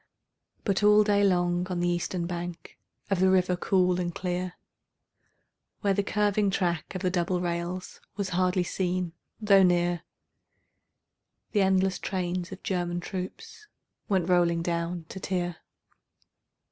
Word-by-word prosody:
But 200 Hz, -2 st, +1 dB
all 210 Hz, 0 st, +6 dB
day 205 Hz, -1 st, +3 dB
long 175 Hz, -2 st, +2 dB
on 180 Hz, -1 st, -2 dB
the 175 Hz, -, +1 dB
eastern 175 Hz, 0 st, -1 dB
bank 175 Hz, 0 st, -6 dB, 0.3 s
Of 195 Hz, -, +2 dB
the 190 Hz, 0 st, +4 dB
river 185 Hz, -1 st, +3 dB
cool 180 Hz, 0 st, +2 dB
and 175 Hz, -1 st, -1 dB
clear, 180 Hz, 0 st, -2 dB, 1.3 s
Where 200 Hz, -2 st, +2 dB
the 200 Hz, -, +1 dB
curving 205 Hz, 0 st, +1 dB
track 175 Hz, -2 st, -1 dB
of 185 Hz, -, -4 dB
the 185 Hz, -, +1 dB
double 180 Hz, 0 st, 0 dB
rails 175 Hz, +1 st, -4 dB, 0.2 s
Was 200 Hz, -2 st, -2 dB
hardly 185 Hz, 0 st, +1 dB
seen 180 Hz, -1 st, -2 dB, 0.3 s
though 200 Hz, -3 st, +5 dB
near, 175 Hz, -1 st, +3 dB, 1.5 s
The 205 Hz, -, +2 dB
endless 190 Hz, -1 st, +2 dB
trains 180 Hz, -1 st, -3 dB
of 190 Hz, -, -9 dB
German 175 Hz, -2 st, -1 dB
troops 420 Hz, -, -7 dB, 0.4 s
Went 185 Hz, -4 st, +1 dB
rolling 170 Hz, -2 st, +3 dB
down 170 Hz, 0 st, -2 dB
to 190 Hz, -, -7 dB
Trier. 175 Hz, -3 st, -2 dB
180 Hz, 135 wpm, -28 LUFS, 175-190 Hz, 1.5 s, all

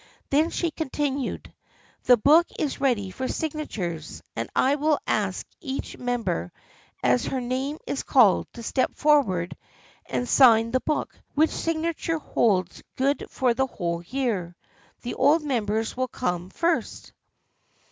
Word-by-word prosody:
Then 305 Hz, +4 st, +3 dB
she 340 Hz, -1 st, -1 dB
continued: 285 Hz, -3 st, -3 dB, 0.3 s
" -, -, -33 dB
The 245 Hz, -, +7 dB
book 310 Hz, +9 st, +5 dB
is 295 Hz, -, -2 dB
ready 225 Hz, -8 st, +1 dB
for 260 Hz, +6 st, -4 dB
signatures, 205 Hz, -, -4 dB
and 115 Hz, 0 st, -3 dB
I 270 Hz, -, +4 dB
will 300 Hz, +1 st, +2 dB
ask -, -, -1 dB, 0.2 s
each 275 Hz, -5 st, -5 dB
member 235 Hz, -, -2 dB, 0.5 s
as 125 Hz, 0 st, +3 dB
her 265 Hz, -, -2 dB
name 260 Hz, +4 st, -2 dB
is 280 Hz, -, -2 dB
called 225 Hz, -8 st, +4 dB
to 235 Hz, -, -9 dB
step 255 Hz, +3 st, 0 dB
forward 230 Hz, -, +2 dB, 0.5 s
and 245 Hz, -, -2 dB
sign 230 Hz, -4 st, +6 dB
the 255 Hz, -, +2 dB
book, 305 Hz, +3 st, -2 dB, 0.2 s
which 315 Hz, +2 st, +3 dB
signature 330 Hz, 0 st, -1 dB
holds 195 Hz, -, 0 dB
good 275 Hz, +2 st, 0 dB
for 255 Hz, -3 st, +1 dB
the 265 Hz, +3 st, 0 dB
whole 170 Hz, -7 st, -3 dB
year. 195 Hz, -5 st, -2 dB, 0.5 s
The 245 Hz, -, -3 dB
old 295 Hz, +5 st, +3 dB
members 225 Hz, -5 st, -1 dB
will 255 Hz, 0 st, -1 dB
come 180 Hz, -7 st, -3 dB
first." 335 Hz, -, -2 dB
255 Hz, 140 wpm, -25 LUFS, 205-295 Hz, 0.5 s, The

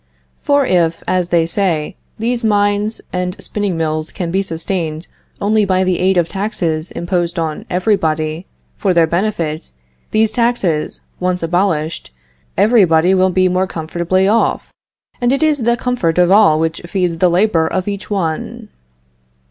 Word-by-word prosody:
For 285 Hz, -1 st, +2 dB
if, 170 Hz, -5 st, +1 dB
as 180 Hz, -1 st, +1 dB
they 170 Hz, -2 st, +2 dB
say, 165 Hz, -4 st, 0 dB, 0.2 s
these 235 Hz, +2 st, -1 dB
mines 205 Hz, 0 st, +1 dB
and 180 Hz, +1 st, -3 dB
spinning 205 Hz, -5 st, -2 dB
mills 155 Hz, -1 st, -2 dB
can 175 Hz, -4 st, -4 dB
be 190 Hz, +2 st, +1 dB
sustained 165 Hz, -2 st, -3 dB, 0.3 s
only 215 Hz, +1 st, +2 dB
by 190 Hz, -1 st, +1 dB
the 185 Hz, -1 st, 0 dB
aid 190 Hz, 0 st, +2 dB
of 170 Hz, -2 st, +2 dB
taxes 180 Hz, -5 st, -2 dB
imposed 175 Hz, 0 st, -2 dB
on 160 Hz, -2 st, -3 dB
everybody 165 Hz, -3 st, 0 dB, 0.3 s
for 190 Hz, -3 st, +1 dB
their 170 Hz, -1 st, +5 dB
benefit, 170 Hz, -, -2 dB, 0.4 s
these 220 Hz, 0 st, +2 dB
taxes 215 Hz, -10 st, 0 dB, 0.2 s
once 180 Hz, -1 st, -1 dB
abolished, 165 Hz, -2 st, -1 dB, 0.5 s
everybody 190 Hz, -5 st, +4 dB
will 190 Hz, 0 st, +3 dB
be 185 Hz, 0 st, +2 dB
more 185 Hz, +1 st, 0 dB
comfortably 170 Hz, +3 st, -1 dB
off, 225 Hz, +3 st, 0 dB, 0.5 s
and 245 Hz, 0 st, +2 dB
it 275 Hz, +3 st, +1 dB
is 305 Hz, -2 st, +2 dB
the 235 Hz, 0 st, +2 dB
comfort 240 Hz, -12 st, -1 dB
of 180 Hz, 0 st, +4 dB
all 195 Hz, -7 st, +5 dB
which 160 Hz, 0 st, -1 dB
feeds 175 Hz, -3 st, -1 dB
the 180 Hz, -, +4 dB
labor 175 Hz, -2 st, +2 dB
of 185 Hz, +3 st, -2 dB
each 200 Hz, 0 st, -5 dB
one. 170 Hz, -6 st, -3 dB
180 Hz, 150 wpm, -16 LUFS, 165-205 Hz, 0.5 s, their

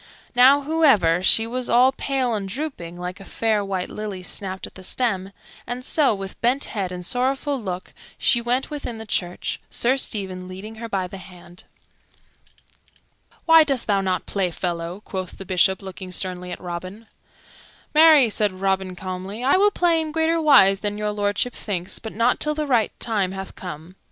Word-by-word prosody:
Now, 265 Hz, +3 st, +6 dB
however, 275 Hz, -, +3 dB
she 225 Hz, +4 st, +5 dB
was 250 Hz, +2 st, -3 dB
all 250 Hz, +3 st, +5 dB
pale 265 Hz, -2 st, -1 dB
and 200 Hz, -3 st, -3 dB
drooping, 200 Hz, -, -5 dB
like 180 Hz, +2 st, -6 dB
a -, -, -10 dB
fair 215 Hz, +1 st, 0 dB
white 190 Hz, -2 st, -2 dB
lily 205 Hz, -3 st, -6 dB
snapped 190 Hz, +1 st, -2 dB
at -, -, -11 dB
the 185 Hz, -, -11 dB
stem; 195 Hz, -2 st, -1 dB, 0.4 s
and 250 Hz, +1 st, -5 dB
so, 285 Hz, -8 st, +3 dB
with 195 Hz, 0 st, -8 dB
bent 250 Hz, +4 st, +2 dB
head 195 Hz, -4 st, -3 dB
and 180 Hz, -1 st, -6 dB
sorrowful 265 Hz, -, 0 dB
look, 185 Hz, -3 st, -6 dB, 0.2 s
she 240 Hz, -, +2 dB
went 250 Hz, +5 st, -1 dB
within 285 Hz, -6 st, -5 dB
the 220 Hz, -, -8 dB
church, 180 Hz, -4 st, -2 dB
Sir 255 Hz, +3 st, +1 dB
Stephen 190 Hz, -7 st, -3 dB
leading 200 Hz, +4 st, -9 dB
her 230 Hz, -, -5 dB
by 195 Hz, -3 st, -1 dB
the 190 Hz, +2 st, -8 dB
hand. 180 Hz, -1 st, -14 dB, 1.8 s
"Why 325 Hz, -1 st, +8 dB
dost 275 Hz, -5 st, -1 dB
thou 200 Hz, -2 st, +2 dB
not 185 Hz, -1 st, -1 dB
play, 195 Hz, -3 st, -1 dB
fellow?" 170 Hz, +2 st, -4 dB
quoth 185 Hz, -2 st, -5 dB
the 195 Hz, -, -8 dB
Bishop, 190 Hz, +1 st, +2 dB
looking 190 Hz, -1 st, -8 dB
sternly 180 Hz, -1 st, -4 dB
at -, -, -6 dB
Robin. 185 Hz, +5 st, -7 dB, 0.9 s
"Marry," 310 Hz, -4 st, +7 dB
said 210 Hz, -2 st, +1 dB
Robin 190 Hz, -1 st, -1 dB
calmly, 190 Hz, +5 st, -6 dB
"I 270 Hz, -, +4 dB
will 405 Hz, +2 st, +5 dB
play 345 Hz, -4 st, +2 dB
in 310 Hz, -1 st, -4 dB
greater 325 Hz, +1 st, +1 dB
wise 195 Hz, -11 st, +6 dB
than 205 Hz, 0 st, -2 dB
Your 210 Hz, 0 st, -1 dB
Lordship 205 Hz, +4 st, -1 dB
thinks, 185 Hz, -4 st, -4 dB
but 220 Hz, -, -7 dB
not 230 Hz, +3 st, +2 dB
till 300 Hz, 0 st, -1 dB
the 305 Hz, 0 st, -2 dB
right 240 Hz, -6 st, +2 dB
time 200 Hz, -5 st, 0 dB
hath 190 Hz, 0 st, -7 dB
come." 170 Hz, -1 st, -9 dB
205 Hz, 180 wpm, -23 LUFS, 185-255 Hz, 1.8 s, Why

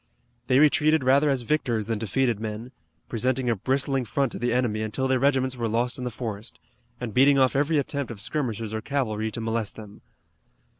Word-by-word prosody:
They 130 Hz, -, +4 dB
retreated 155 Hz, +1 st, +4 dB
rather 140 Hz, +3 st, +4 dB
as 135 Hz, -3 st, 0 dB
victors 120 Hz, -5 st, 0 dB
than 110 Hz, -1 st, -2 dB
defeated 120 Hz, +1 st, 0 dB
men, 110 Hz, +3 st, -5 dB, 0.4 s
presenting 125 Hz, +2 st, 0 dB
a -, -, +1 dB
bristling 135 Hz, +4 st, 0 dB
front 135 Hz, +2 st, -1 dB
to -, -, -6 dB
the 120 Hz, 0 st, 0 dB
enemy 120 Hz, -3 st, 0 dB
until 110 Hz, +5 st, -2 dB
their 130 Hz, -1 st, +2 dB
regiments 130 Hz, -1 st, +2 dB
were 120 Hz, -2 st, -2 dB
lost 120 Hz, +3 st, -1 dB
in 125 Hz, -, -4 dB
the -, -, -1 dB
forest, 110 Hz, -2 st, -6 dB, 0.4 s
and 120 Hz, -4 st, -5 dB
beating 135 Hz, +4 st, +5 dB
off 130 Hz, -1 st, +3 dB
every 150 Hz, +3 st, +2 dB
attempt 140 Hz, -1 st, -2 dB
of 115 Hz, -4 st, -8 dB
skirmishers 115 Hz, -3 st, -3 dB
or 110 Hz, -, -2 dB
cavalry 110 Hz, -5 st, -1 dB
to 110 Hz, -, -5 dB
molest 115 Hz, -1 st, -2 dB
them. 105 Hz, -2 st, -12 dB
125 Hz, 195 wpm, -25 LUFS, 110-135 Hz, 0.4 s, beating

